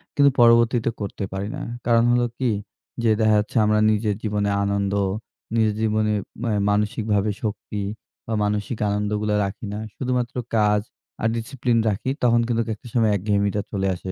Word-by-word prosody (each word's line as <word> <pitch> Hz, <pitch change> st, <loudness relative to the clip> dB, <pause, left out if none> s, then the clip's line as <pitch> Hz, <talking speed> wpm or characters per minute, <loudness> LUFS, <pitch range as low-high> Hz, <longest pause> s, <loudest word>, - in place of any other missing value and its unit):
কিন্তু 140 Hz, -2 st, +6 dB
পরবর্তীতে 115 Hz, 0 st, +5 dB
করতে 100 Hz, 0 st, -4 dB
পারি 100 Hz, +2 st, -3 dB
না। -, -, -6 dB, 0.2 s
কারণ 115 Hz, 0 st, +4 dB
হলো 120 Hz, 0 st, +3 dB
কি? 125 Hz, -3 st, +1 dB, 0.5 s
যে, 115 Hz, -, +3 dB
দেখা 110 Hz, -1 st, +4 dB
যাচ্ছে, 105 Hz, +4 st, -3 dB
আমরা 105 Hz, 0 st, +3 dB
নিজের 105 Hz, -1 st, 0 dB
জীবনে 105 Hz, -1 st, 0 dB
আনন্দ, 100 Hz, 0 st, 0 dB, 0.6 s
নিজের 110 Hz, -2 st, +2 dB
জীবনে 110 Hz, -1 st, +1 dB, 0.3 s
অ্যা 115 Hz, -, 0 dB, 0.2 s
মানসিকভাবে 105 Hz, 0 st, +1 dB
শক্তি 105 Hz, -1 st, -3 dB, 0.4 s
বা 115 Hz, -, -3 dB
মানসিক 105 Hz, +3 st, -1 dB
আনন্দগুলা 105 Hz, +1 st, 0 dB
রাখি 100 Hz, +3 st, -6 dB
না 105 Hz, -, -4 dB, 0.2 s
শুধুমাত্র 125 Hz, -2 st, -2 dB, 0.2 s
কাজ 105 Hz, -1 st, +3 dB, 0.4 s
আর 110 Hz, -, +2 dB
ডিসিপ্লিন 120 Hz, 0 st, -1 dB
রাখি। 105 Hz, +5 st, -2 dB
তখন 120 Hz, -1 st, +4 dB
কিন্তু 115 Hz, -1 st, +1 dB
একটা 110 Hz, -, -14 dB
সময় 115 Hz, -3 st, +3 dB
একঘেয়েমিটা 100 Hz, +1 st, 0 dB
চলে 95 Hz, -1 st, -1 dB
আসে। 95 Hz, +1 st, -6 dB
105 Hz, 155 wpm, -23 LUFS, 105-115 Hz, 0.6 s, কিন্তু